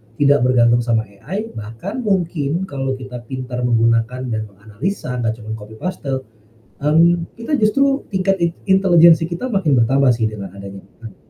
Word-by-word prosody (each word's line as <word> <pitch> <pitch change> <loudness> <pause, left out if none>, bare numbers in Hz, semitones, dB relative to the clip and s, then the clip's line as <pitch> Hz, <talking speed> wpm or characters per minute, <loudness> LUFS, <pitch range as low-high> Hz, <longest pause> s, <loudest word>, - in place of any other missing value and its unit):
tidak 145 0 +4
bergantung 120 -1 +4
sama 115 -2 +1
AI, 190 - -7
bahkan 115 - -7
mungkin 175 - -1
kalau 135 -5 -3
kita 130 -1 -8
pintar 130 -1 -5
menggunakan 115 +2 +1
dan 110 -1 -3
menganalisa, 110 - -5
nggak 110 -2 -1
cuman 110 - -7
copy 105 +1 -12
paste, 135 -4 -4 0.6
mmm, 165 +2 +3
kita 285 +6 0
justru 275 +5 +2
tingkat 190 +1 +1
int 170 - 0 0.2
intelegensi 170 -4 +6
kita 170 +10 -4
makin 195 - 0
bertambah 130 +2 +3
sih 115 -1 0
dengan 100 -3 -8
adanya 100 -1 -10 0.2
AI. 110 -5 -10
130 Hz, 155 wpm, -19 LUFS, 115-175 Hz, 0.6 s, intelegensi